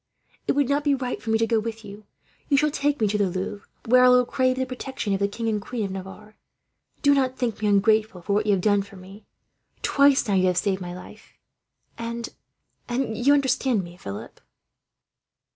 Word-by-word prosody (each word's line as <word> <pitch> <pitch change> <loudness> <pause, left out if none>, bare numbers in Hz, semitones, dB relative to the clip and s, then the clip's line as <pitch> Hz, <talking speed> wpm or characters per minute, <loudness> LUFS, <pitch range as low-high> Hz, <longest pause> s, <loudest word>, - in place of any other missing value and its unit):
It - - +3
would 285 -2 +2
not 285 +2 +1
be 290 -1 +3
right 255 -2 -4
for 225 - -6
me 220 - +3
to 225 - +2
go 225 0 +1
with 225 0 -6
you. 205 +1 -11 0.4
You 280 - +4
shall 300 +1 +2
take 290 0 0
me 215 - +2
to 210 +1 -1
the 200 -2 +2
Louvre, 190 +3 -5 0.2
where 250 +2 +5
I 250 - +7
will 250 0 +5
crave 255 +1 +1
the 260 - 0
protection 255 -4 -4
of 195 - 0
the 200 - +2
King 225 +3 -5
and 215 -2 0
Queen 225 +1 -4
of 195 - -5
Navarre. 195 +3 -9 0.7
"Do 285 -1 +6
not 260 -2 +1
think 235 -4 -2
me 210 - +1
ungrateful 210 -2 +2
for 200 - -1
what 210 +1 +1
you 205 - +4
have 190 - +1
done 205 0 +3
for 200 0 -12
me. 195 +3 -13 0.6
Twice 280 -3 +4
now 205 - 0
you 185 -1 +3
have 180 -1 +1
saved 195 0 0
my 175 0 -6
life, 180 - -13 0.7
and, 235 0 -4 0.6
and 240 -2 -1
you 270 +6 +4
understand 260 -5 +1
me, 175 0 -11
Philip?" 100 - -9
220 Hz, 215 wpm, -24 LUFS, 200-255 Hz, 0.7 s, I